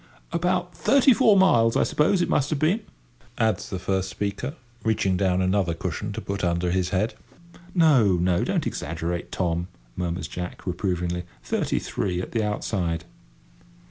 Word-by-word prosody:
"About 180 Hz, +1 st, 0 dB
thirty 275 Hz, -1 st, +5 dB
four 210 Hz, -2 st, +5 dB
miles, 115 Hz, -12 st, +4 dB
I -, -, +4 dB
suppose, 175 Hz, +4 st, +2 dB
it -, -, -1 dB
must 145 Hz, +1 st, +1 dB
have 155 Hz, -, 0 dB
been," 160 Hz, +9 st, +2 dB, 0.6 s
adds 110 Hz, -4 st, 0 dB
the 95 Hz, -, -3 dB
first 95 Hz, +1 st, -1 dB
speaker, 100 Hz, -, -3 dB, 0.3 s
reaching 105 Hz, -4 st, +1 dB
down 95 Hz, -1 st, +1 dB
another 95 Hz, -2 st, +1 dB
cushion -, -, -4 dB
to -, -, -5 dB
put 100 Hz, -1 st, -4 dB
under 85 Hz, 0 st, +1 dB
his 90 Hz, 0 st, 0 dB
head. 105 Hz, +4 st, 0 dB, 0.6 s
"No—no; 100 Hz, -, +4 dB
don't -, -, 0 dB
exaggerate, 85 Hz, +3 st, -3 dB
Tom," 85 Hz, -1 st, -1 dB, 0.3 s
murmurs 90 Hz, 0 st, -3 dB
Jack, 90 Hz, 0 st, -6 dB
reprovingly; 90 Hz, -1 st, -2 dB, 0.2 s
"thirty -, -, -1 dB
three 90 Hz, -3 st, -2 dB
at 90 Hz, -, -5 dB
the 115 Hz, -, 0 dB
outside." 90 Hz, -6 st, -2 dB
95 Hz, 150 wpm, -25 LUFS, 90-130 Hz, 0.6 s, thirty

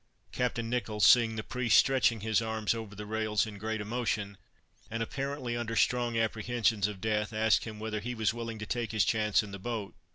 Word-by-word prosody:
Captain 120 Hz, -2 st, -1 dB
Nicholls 110 Hz, -3 st, 0 dB
seeing 115 Hz, 0 st, +6 dB
the 110 Hz, -, -3 dB
priest 125 Hz, -2 st, +2 dB
stretching 130 Hz, -5 st, +3 dB
his 110 Hz, +1 st, +1 dB
arms 110 Hz, -1 st, -1 dB
over 110 Hz, -3 st, -7 dB
the 105 Hz, +1 st, -7 dB
rails 110 Hz, 0 st, 0 dB
in 105 Hz, -2 st, -8 dB
great 110 Hz, +1 st, -2 dB
emotion, 105 Hz, -2 st, -2 dB, 0.5 s
and 115 Hz, 0 st, -2 dB
apparently 135 Hz, 0 st, -3 dB
under 115 Hz, -1 st, -3 dB
strong 120 Hz, 0 st, +2 dB
apprehensions 115 Hz, -2 st, +1 dB
of 105 Hz, -2 st, -7 dB
death, 105 Hz, +1 st, -1 dB
asked 110 Hz, 0 st, +2 dB
him 110 Hz, -2 st, -7 dB
whether 110 Hz, 0 st, -3 dB
he 120 Hz, +4 st, -4 dB
was 110 Hz, -1 st, +1 dB
willing 115 Hz, -1 st, -5 dB
to 110 Hz, -, -6 dB
take 115 Hz, +1 st, -2 dB
his 110 Hz, -, +3 dB
chance 110 Hz, -1 st, +2 dB
in 105 Hz, -, -9 dB
the 100 Hz, -, -7 dB
boat. 110 Hz, -1 st, -4 dB
110 Hz, 200 wpm, -30 LUFS, 105-120 Hz, 0.5 s, seeing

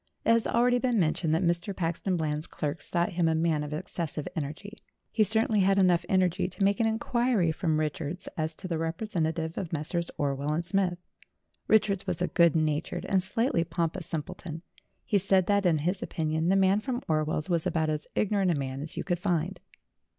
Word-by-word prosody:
It -, -, +4 dB
has 230 Hz, -1 st, +4 dB
already 245 Hz, +1 st, +3 dB
been 245 Hz, -3 st, +1 dB
mentioned 160 Hz, -1 st, +1 dB
that 170 Hz, -, +1 dB
Mr. 175 Hz, +4 st, 0 dB
Paxton 175 Hz, +2 st, -1 dB
Eland's 155 Hz, -1 st, -2 dB
clerks 150 Hz, +2 st, -4 dB
thought 175 Hz, 0 st, +1 dB
him 170 Hz, -1 st, +1 dB
a 160 Hz, -, +2 dB
man 160 Hz, -2 st, +1 dB
of 150 Hz, -, -6 dB
excessive 160 Hz, -1 st, -4 dB
energy; 160 Hz, +7 st, -5 dB, 0.3 s
he 220 Hz, -, +3 dB
certainly 220 Hz, +1 st, +2 dB
had 195 Hz, 0 st, +3 dB
enough 180 Hz, -3 st, +4 dB
energy 185 Hz, -1 st, +2 dB
to 190 Hz, +2 st, -3 dB
make 200 Hz, 0 st, +3 dB
an 225 Hz, -, +3 dB
inquiry 225 Hz, -4 st, +1 dB
from 160 Hz, -1 st, 0 dB
Richards 155 Hz, +3 st, -3 dB
as 160 Hz, 0 st, -2 dB
to 185 Hz, -, -7 dB
the 165 Hz, -3 st, -2 dB
representative 165 Hz, -2 st, -2 dB
of 175 Hz, -, -5 dB
Messrs. 170 Hz, +2 st, -2 dB
Orwell 140 Hz, +1 st, -1 dB
and 170 Hz, +2 st, -1 dB
Smith. 185 Hz, -1 st, +1 dB, 0.7 s
Richards 200 Hz, -3 st, +3 dB
was -, -, -2 dB
a 180 Hz, -, +1 dB
good 170 Hz, -3 st, +4 dB
natured 155 Hz, +2 st, -1 dB
and 190 Hz, -1 st, +2 dB
slightly 190 Hz, -1 st, +1 dB
pompous 170 Hz, +1 st, -2 dB
simpleton. 160 Hz, +1 st, -5 dB, 0.4 s
He 205 Hz, -, +2 dB
said 190 Hz, -1 st, +3 dB
that, 200 Hz, -1 st, +2 dB
in 165 Hz, -3 st, +3 dB
his 180 Hz, +6 st, -1 dB
opinion, 160 Hz, +1 st, -1 dB
the 190 Hz, -, +4 dB
man 195 Hz, +1 st, +4 dB
from 245 Hz, +3 st, -3 dB
Orwell's 155 Hz, 0 st, 0 dB
was 170 Hz, -3 st, 0 dB
about 160 Hz, -2 st, 0 dB
as 150 Hz, 0 st, -3 dB
ignorant 200 Hz, -2 st, +2 dB
a 170 Hz, -, +2 dB
man 135 Hz, 0 st, -4 dB
as 155 Hz, -, -6 dB
you -, -, -2 dB
could 175 Hz, -2 st, -1 dB
find. 180 Hz, -1 st, -1 dB
175 Hz, 195 wpm, -28 LUFS, 160-195 Hz, 0.7 s, It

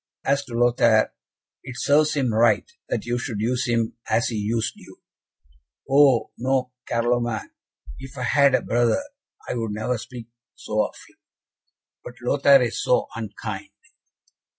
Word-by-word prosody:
"As 140 Hz, +1 st, +1 dB
to 120 Hz, -3 st, -8 dB
Lothaire, 120 Hz, -2 st, +3 dB, 0.5 s
it 130 Hz, -1 st, -9 dB
serves 150 Hz, +2 st, +3 dB
him 130 Hz, -5 st, 0 dB
right, 110 Hz, -1 st, +3 dB, 0.2 s
that -, -, -2 dB
you 120 Hz, 0 st, -1 dB
should 115 Hz, -4 st, -4 dB
use 125 Hz, +3 st, 0 dB
him 115 Hz, 0 st, 0 dB
as 115 Hz, -, +2 dB
he 115 Hz, -, -4 dB
used 110 Hz, +2 st, -1 dB
you." -, -, -16 dB, 0.9 s
"Oh, 135 Hz, -3 st, +4 dB
no, 130 Hz, 0 st, 0 dB, 0.2 s
Carloman; 120 Hz, -1 st, -1 dB, 0.5 s
if 135 Hz, +1 st, -11 dB
I 125 Hz, -, -3 dB
had 140 Hz, +1 st, +4 dB
a -, -, 0 dB
brother 120 Hz, -, +1 dB, 0.4 s
I -, -, -2 dB
would 115 Hz, -3 st, -3 dB
never 110 Hz, +3 st, -2 dB
speak 120 Hz, 0 st, -9 dB, 0.3 s
so 110 Hz, 0 st, -1 dB
of -, -, -17 dB
him." -, -, -24 dB, 0.9 s
"But 120 Hz, -, -10 dB
Lothaire 135 Hz, +2 st, +4 dB
is 120 Hz, -, -2 dB
so -, -, +1 dB
unkind." 300 Hz, -, -6 dB
120 Hz, 150 wpm, -23 LUFS, 115-135 Hz, 0.9 s, Oh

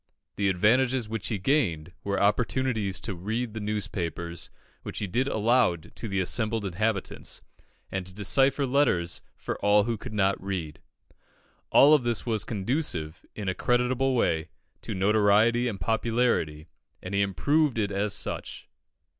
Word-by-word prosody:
The 100 Hz, -1 st, +1 dB
advantages 120 Hz, +6 st, +2 dB
which 110 Hz, -2 st, -4 dB
he 110 Hz, -, -1 dB
gained 90 Hz, -, 0 dB
were 100 Hz, 0 st, -1 dB
opportunities 110 Hz, -1 st, +1 dB
to 105 Hz, -, -4 dB
read 110 Hz, +6 st, -3 dB
the 110 Hz, -, -4 dB
newspapers, 85 Hz, -5 st, -3 dB, 0.3 s
which -, -, -7 dB
he 105 Hz, -, -1 dB
did 120 Hz, +8 st, 0 dB
aloud 110 Hz, -, +1 dB
to 110 Hz, +4 st, -4 dB
the 100 Hz, -2 st, -1 dB
assembled 110 Hz, +3 st, 0 dB
inhabitants, 100 Hz, +2 st, -2 dB, 0.5 s
and 95 Hz, -1 st, -2 dB
to -, -, -10 dB
decipher 135 Hz, +8 st, +2 dB
letters 125 Hz, -11 st, +1 dB
for -, -, -5 dB
all 105 Hz, 0 st, +5 dB
who 115 Hz, -1 st, -2 dB
could 115 Hz, -2 st, -7 dB
not 95 Hz, -2 st, +1 dB
read. 90 Hz, -6 st, -4 dB, 0.9 s
All 145 Hz, +2 st, +7 dB
of 150 Hz, -, +5 dB
this 120 Hz, -2 st, -1 dB
was 110 Hz, -3 st, 0 dB
conducive, 95 Hz, -, -2 dB
in 105 Hz, -2 st, -5 dB
a 95 Hz, -, +1 dB
creditable 125 Hz, +5 st, +1 dB
way, 80 Hz, -8 st, +1 dB, 0.3 s
to -, -, -5 dB
notoriety 105 Hz, +4 st, +3 dB
and 105 Hz, -5 st, -3 dB
popularity, 110 Hz, -7 st, 0 dB, 0.4 s
and 90 Hz, -, -6 dB
he 100 Hz, -, +2 dB
improved 125 Hz, -, +1 dB
it 100 Hz, -2 st, 0 dB
as 100 Hz, +1 st, 0 dB
such. -, -, -4 dB
105 Hz, 150 wpm, -27 LUFS, 95-120 Hz, 0.9 s, All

